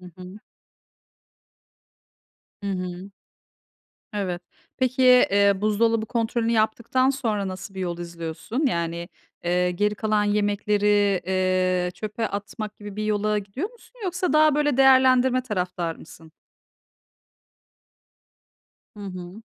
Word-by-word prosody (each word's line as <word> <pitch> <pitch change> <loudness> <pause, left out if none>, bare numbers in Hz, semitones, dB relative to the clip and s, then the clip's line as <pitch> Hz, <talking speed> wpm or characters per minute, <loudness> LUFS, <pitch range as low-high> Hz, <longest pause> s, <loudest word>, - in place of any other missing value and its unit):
Hı - - -15
hı. 185 +3 -10 2.2
Hı - - -4
hı. 185 +1 -5 1.0
Evet. 185 -4 -3 0.4
Peki, 255 0 +1
eee, 200 -6 +6
buzdolabı 220 +2 +1
kontrolünü 230 0 -1
yaptıktan 235 +4 +1
sonra 225 -7 -1
nasıl 190 +1 -7
bir - - -5
yol 175 -2 -3
izliyorsun? 170 - -4
Yani, 170 -3 -2 0.3
eee, 180 +1 +1
geri 210 +4 0
kalan 215 -1 +1
yemekleri, 205 -1 +2
eee, 185 -1 +1
çöpe 215 +2 -3
atmak 205 +1 -6
gibi 205 -1 -9
bir 215 - -3
yola 210 0 +1
gidiyor 210 - -4
musun? 485 +1 -21
Yoksa 360 -2 -1
daha 305 -1 +5
böyle 295 -3 +1
değerlendirme 260 -1 +5
taraftarı 180 -7 -3
mısın? 160 0 -14 2.6
Hı 210 - -12
hı. 185 +1 -8
205 Hz, 110 wpm, -24 LUFS, 185-235 Hz, 2.6 s, eee